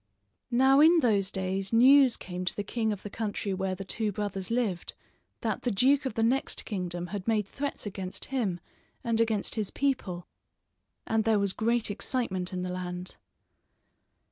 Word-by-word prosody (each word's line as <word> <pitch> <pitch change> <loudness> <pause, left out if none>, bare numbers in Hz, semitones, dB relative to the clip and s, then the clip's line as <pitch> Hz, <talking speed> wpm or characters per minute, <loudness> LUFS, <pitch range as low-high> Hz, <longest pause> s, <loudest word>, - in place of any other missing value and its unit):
Now 265 +3 +5
in 325 +2 +7
those 200 -6 +2
days 190 0 -2
news 255 +2 +6
came 180 0 -6
to - - -1
the 205 - -2
king 220 +2 -1
of 205 -2 -5
the 205 - -6
country 205 -2 -3
where 190 0 -2
the 195 - -7
two 215 +2 -1
brothers 195 -2 -4
lived 230 -7 -1 0.5
that - - -2
the 245 - 0
duke 265 +6 +3
of 215 - -6
the 225 - +1
next 255 +4 0
kingdom 175 -4 -3
had 200 -1 -4
made 215 -3 +2
threats 280 +6 -5
against 190 -2 -5
him, 205 -10 0 0.4
and 230 -1 +2
against 220 -3 +1
his 215 -3 -1
people; 205 -11 -1 0.8
and 225 0 +1
there 220 -1 +3
was 200 -1 +1
great 230 0 +1
excitement 195 -3 -1
in 180 -1 -3
the 180 0 -3
land. 180 0 -5
210 Hz, 170 wpm, -29 LUFS, 190-235 Hz, 0.8 s, in